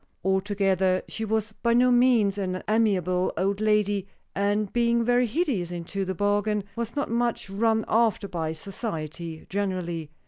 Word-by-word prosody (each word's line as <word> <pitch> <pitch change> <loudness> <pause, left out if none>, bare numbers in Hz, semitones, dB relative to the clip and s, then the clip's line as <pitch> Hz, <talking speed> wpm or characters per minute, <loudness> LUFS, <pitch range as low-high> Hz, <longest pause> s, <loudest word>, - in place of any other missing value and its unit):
Altogether, 190 -1 +1
she 225 - -5
was 220 0 -1
by 235 +2 0
no 250 +1 +5
means 240 -5 +4
an 185 -1 -3
amiable 185 -5 +2
old 200 +2 0
lady, 205 -2 +1 0.3
and, 205 0 0
being 235 -1 +2
very 245 +1 +3
hideous 230 - -1
into 175 +3 -4
the 190 0 -3
bargain, 205 +1 +1
was 235 +1 -4
not 285 -5 -2
much 235 -4 -1
run 220 +2 +1
after 225 -2 +2
by 165 -4 -3
society 165 -3 -6
generally. 180 -5 -3
205 Hz, 145 wpm, -26 LUFS, 185-225 Hz, 0.3 s, no